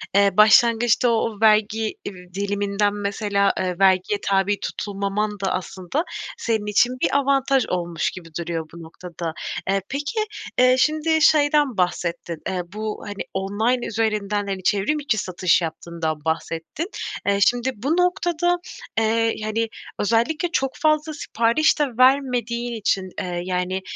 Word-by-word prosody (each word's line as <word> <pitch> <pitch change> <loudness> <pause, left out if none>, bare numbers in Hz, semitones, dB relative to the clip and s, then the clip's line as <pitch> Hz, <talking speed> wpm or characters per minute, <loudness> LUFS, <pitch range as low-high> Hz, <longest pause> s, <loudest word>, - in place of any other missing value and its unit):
eee, 200 0 +5
başlangıçta 230 +2 +5
o - - +3
o 220 -2 -4
vergi, 215 0 +3
iii, 180 -2 -9
diliminden, 200 +1 0
mesela, 200 0 0
eee, 180 -1 -2
vergiye 190 +1 +3
tabi 195 +1 +2
tutulmaman 205 +1 -2
da 195 -1 -1
aslında 185 - -3 0.3
senin 220 -3 -1
için 210 +4 +3
bir 280 - +2
avantaj 275 -2 +2
olmuş 175 -2 -1
gibi 175 -3 -11
duruyor 165 -1 -3
bu 170 -1 -10
noktada. 165 0 -7 0.4
Eee, 195 0 +2
peki, 295 +11 -3 0.4
eee, 255 0 +6
şimdi 310 +2 +2
şeyden 290 -5 +4
bahsettin, 175 -2 -2
eee, 185 -1 -1
bu, 215 0 -4
hani, 205 -1 -5
online 215 +6 0
üzerinden, 210 -2 -1
hani, 190 -1 -4
çevrim 205 +10 +1
içi 260 -7 0
satış 185 -2 +1
yaptığından 160 -1 -4
bahsettin. 165 - -3 0.4
Eee, 200 0 +2
şimdi 245 +2 +1
bu 275 +11 -1
noktada, 350 -1 +1 0.4
eee, 225 +1 +1
hani, 225 +1 -1 0.3
özellikle 235 - +1
çok 270 -5 0
fazla 310 +1 +1
sipariş 235 +2 +1
de - - +4
vermediğin 245 -3 +2
için, 195 -4 -1
eee, 175 -1 -3
yani, 185 +1 -2
210 Hz, 140 wpm, -22 LUFS, 190-250 Hz, 0.4 s, eee